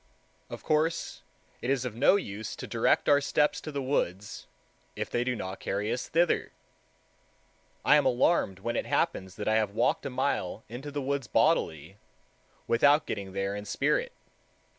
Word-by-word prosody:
Of -, -, -8 dB
course 160 Hz, +2 st, 0 dB, 0.4 s
it 125 Hz, -, -3 dB
is 135 Hz, -2 st, +1 dB
of 125 Hz, -, -4 dB
no 135 Hz, -, +4 dB
use 110 Hz, -, -4 dB
to -, -, -7 dB
direct -, -, +1 dB
our 145 Hz, 0 st, +5 dB
steps 150 Hz, +1 st, +1 dB
to 155 Hz, -, -6 dB
the 140 Hz, -2 st, -3 dB
woods, 105 Hz, -7 st, -2 dB, 0.5 s
if -, -, -4 dB
they 120 Hz, -, +1 dB
do 125 Hz, 0 st, -1 dB
not 95 Hz, -3 st, -6 dB
carry 105 Hz, +3 st, -2 dB
us 125 Hz, -, -4 dB
thither. 170 Hz, 0 st, +1 dB, 1.3 s
I 150 Hz, -, +7 dB
am 145 Hz, -, +3 dB
alarmed 120 Hz, -, +2 dB
when 120 Hz, +3 st, -2 dB
it -, -, -2 dB
happens 95 Hz, 0 st, -1 dB
that 105 Hz, -, -5 dB
I 110 Hz, 0 st, +3 dB
have 105 Hz, -2 st, -1 dB
walked 140 Hz, -, +1 dB
a -, -, -4 dB
mile 115 Hz, -6 st, -2 dB
into 125 Hz, +6 st, -7 dB
the 145 Hz, -1 st, -4 dB
woods 140 Hz, -3 st, -2 dB
bodily, 80 Hz, +2 st, +1 dB, 0.7 s
without 145 Hz, +6 st, +4 dB
getting 95 Hz, -1 st, -5 dB
there 100 Hz, +1 st, -2 dB
in 105 Hz, 0 st, -6 dB
spirit. -, -, 0 dB
120 Hz, 170 wpm, -29 LUFS, 100-145 Hz, 1.3 s, I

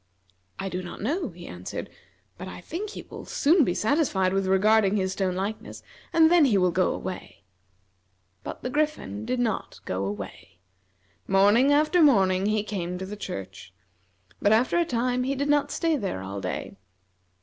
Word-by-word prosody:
"I 195 Hz, -, -4 dB
do 185 Hz, -1 st, -3 dB
not 175 Hz, -, -8 dB
know," 305 Hz, -, -1 dB
he 175 Hz, -1 st, -12 dB
answered, 90 Hz, +1 st, -6 dB, 0.5 s
"but 185 Hz, -, -8 dB
I -, -, -8 dB
think 345 Hz, -, -5 dB
he -, -, -8 dB
will -, -, -10 dB
soon 315 Hz, +3 st, +3 dB
be 180 Hz, -8 st, 0 dB
satisfied 215 Hz, -, +1 dB
with 195 Hz, 0 st, 0 dB
regarding 205 Hz, +1 st, +4 dB
his 190 Hz, -2 st, 0 dB
stone 190 Hz, -2 st, -1 dB
likeness, 200 Hz, +4 st, -5 dB, 0.3 s
and 325 Hz, 0 st, +5 dB
then 345 Hz, -4 st, +6 dB
he 225 Hz, -7 st, +3 dB
will 180 Hz, -1 st, +3 dB
go 185 Hz, +1 st, +2 dB
away." 180 Hz, -, -7 dB, 1.0 s
But -, -, -7 dB
the 250 Hz, -, -3 dB
Griffin 295 Hz, -7 st, -2 dB
did 250 Hz, 0 st, -1 dB
not 225 Hz, -4 st, -2 dB
go 95 Hz, +1 st, -2 dB
away. 100 Hz, -3 st, -7 dB, 0.7 s
Morning 205 Hz, +8 st, +4 dB
after 305 Hz, +4 st, +3 dB
morning 195 Hz, -9 st, +4 dB
he 215 Hz, 0 st, +1 dB
came 180 Hz, -4 st, -4 dB
to 190 Hz, -, -5 dB
the 205 Hz, +2 st, -7 dB
church, 95 Hz, -, -8 dB, 0.7 s
but 205 Hz, -, +3 dB
after 245 Hz, +10 st, +3 dB
a 340 Hz, -, +2 dB
time 250 Hz, -2 st, 0 dB
he 270 Hz, +2 st, -1 dB
did 280 Hz, +2 st, -2 dB
not 290 Hz, -1 st, +3 dB
stay 330 Hz, -2 st, 0 dB
there 195 Hz, -, -3 dB
all 100 Hz, +1 st, -5 dB
day. 90 Hz, +1 st, -5 dB
205 Hz, 175 wpm, -26 LUFS, 185-275 Hz, 1.0 s, then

